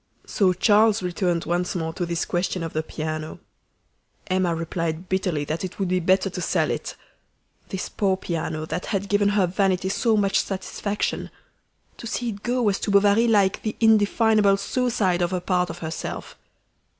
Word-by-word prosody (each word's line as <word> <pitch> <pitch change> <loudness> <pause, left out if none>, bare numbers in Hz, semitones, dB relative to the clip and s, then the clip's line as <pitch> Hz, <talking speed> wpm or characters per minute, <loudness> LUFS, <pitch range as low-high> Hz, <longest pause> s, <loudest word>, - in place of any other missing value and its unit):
So 195 -4 +2
Charles 210 +2 +4
returned 175 -1 -1
once 175 +2 -1
more 160 -2 -2
to 175 +1 -3
this 170 0 -1
question 180 0 -1
of 165 - -5
the 155 - 0
piano. 155 0 -5 0.9
Emma 185 -2 +1
replied 165 +1 -3
bitterly 180 -6 0
that 155 +5 -3
it 180 -1 -5
would 195 -3 -1
be 185 0 +2
better 185 +3 +2
to 180 - -5
sell - - +1
it. - - -4 0.7
This 190 - -4
poor 195 -2 0
piano, 160 -3 -3
that 180 - -4
had 200 -2 -2
given 205 0 +3
her 205 -2 +3
vanity 190 0 0
so 220 +2 +2
much 200 -1 +2
satisfaction 200 +1 -3 0.7
to 235 - -7
see 240 +1 -2
it 200 -2 -7
go 245 +2 0
was 205 -3 +1
to - - -3
Bovary 205 +3 +4
like 200 -4 +3
the 215 - -3
indefinable 215 -2 +4
suicide 200 -5 0
of 175 +1 0
a 180 - 0
part 180 0 0
of - - -6
herself. 160 +1 -5
190 Hz, 175 wpm, -24 LUFS, 175-205 Hz, 0.9 s, Charles